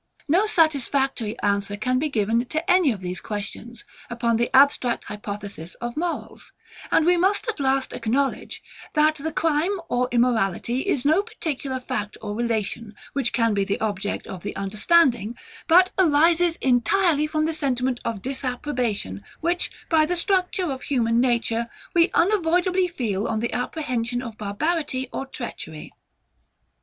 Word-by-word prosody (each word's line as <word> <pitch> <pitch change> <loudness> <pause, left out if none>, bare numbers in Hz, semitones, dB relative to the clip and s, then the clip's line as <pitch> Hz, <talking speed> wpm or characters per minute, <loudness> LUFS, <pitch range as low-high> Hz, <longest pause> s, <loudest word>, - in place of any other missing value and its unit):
No 365 +8 +3
satisfactory 275 - +1
answer 200 0 0
can 255 +4 0
be 305 +2 0
given 230 -1 +1
to 315 +6 -3
any 360 -6 +5
of 205 -5 -5
these 180 0 -4
questions, 220 +3 -6 0.3
upon 235 -1 0
the 235 +1 0
abstract 265 -2 +4
hypothesis 205 -4 -7
of 240 0 -5
morals; 340 +2 -4 0.4
and 315 - +4
we 355 +1 +4
must 390 +6 +1
at 445 -7 -3
last 270 -1 +1
acknowledge, 255 +4 -1 0.3
that 305 +1 +4
the 310 +1 -4
crime 325 +5 +1
or 250 +1 +1
immorality 240 - +1
is 280 -10 0
no 315 +6 +4
particular 285 - -4
fact 250 -5 -4
or 210 -1 -5
relation, 225 -1 -2 0.2
which 265 -4 0
can 230 -2 +2
be 200 -1 +1
the 195 +1 -2
object 205 -2 -2
of 185 - -8
the 205 - -5
understanding, 230 - +2 0.3
but 365 +2 +6
arises 335 +1 +4
entirely 300 - +3
from 310 0 0
the 320 - -1
sentiment 260 -4 0
of 215 -4 -4
disapprobation, 250 - -2 0.2
which, 345 +2 0 0.2
by 320 -2 +4
the 350 +3 0
structure 365 -2 +1
of 265 - -5
human 235 -4 +1
nature, 235 -2 +1 0.3
we 340 0 +4
unavoidably 360 -1 +2
feel 225 - -2
on 220 - -1
the 235 +1 -2
apprehension 245 -2 -2
of 230 -3 -7
barbarity 260 +6 -2
or 270 - -4
treachery. 160 -12 -7
255 Hz, 150 wpm, -24 LUFS, 225-320 Hz, 0.4 s, but